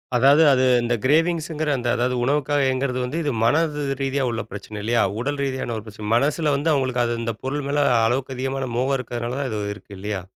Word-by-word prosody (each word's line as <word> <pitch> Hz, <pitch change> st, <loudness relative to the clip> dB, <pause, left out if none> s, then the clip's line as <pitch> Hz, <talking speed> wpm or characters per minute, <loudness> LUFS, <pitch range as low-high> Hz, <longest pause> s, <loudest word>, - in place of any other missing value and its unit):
அதாவது 140 Hz, +6 st, +6 dB
அது 130 Hz, -, +2 dB, 0.2 s
இந்தக் 120 Hz, -2 st, -1 dB
க்ரேவின்ங்ஸ்கிற 160 Hz, 0 st, +1 dB
அந்த 120 Hz, -1 st, -3 dB
அதாவது 125 Hz, +1 st, 0 dB
உணவுக்காக 145 Hz, +1 st, +1 dB
ஏங்குறது 130 Hz, -1 st, -1 dB
வந்து 135 Hz, +6 st, -3 dB
இது 145 Hz, -, 0 dB
மனதுரீதியா 140 Hz, -2 st, 0 dB
உள்ள 115 Hz, 0 st, -2 dB
பிரச்சனை 105 Hz, +1 st, -8 dB
இல்லையா? 115 Hz, +1 st, +2 dB, 0.2 s
உடல் 145 Hz, +3 st, -2 dB
ரீதியான 130 Hz, -3 st, -2 dB
ஒரு 110 Hz, -, -8 dB
பிரச்சனை 105 Hz, -1 st, -8 dB
மனசுல 145 Hz, +4 st, +1 dB
வந்து 155 Hz, +3 st, +1 dB
அவங்களுக்கு 130 Hz, -3 st, +1 dB
அது 120 Hz, 0 st, -1 dB
அந்தப் 115 Hz, -2 st, -4 dB
பொருள் 145 Hz, +1 st, -2 dB
மேல 145 Hz, 0 st, +2 dB, 0.2 s
அளவுக்கு 130 Hz, +2 st, -1 dB
அதிகமான 135 Hz, 0 st, -2 dB
மோகம் 135 Hz, +2 st, +1 dB
இருக்கறதுனாலதான் 125 Hz, +2 st, -3 dB
இது 105 Hz, -1 st, -3 dB
இருக்கு 100 Hz, -1 st, -13 dB
இல்லையா? 100 Hz, -1 st, -3 dB
130 Hz, 185 wpm, -22 LUFS, 120-145 Hz, 0.2 s, அதாவது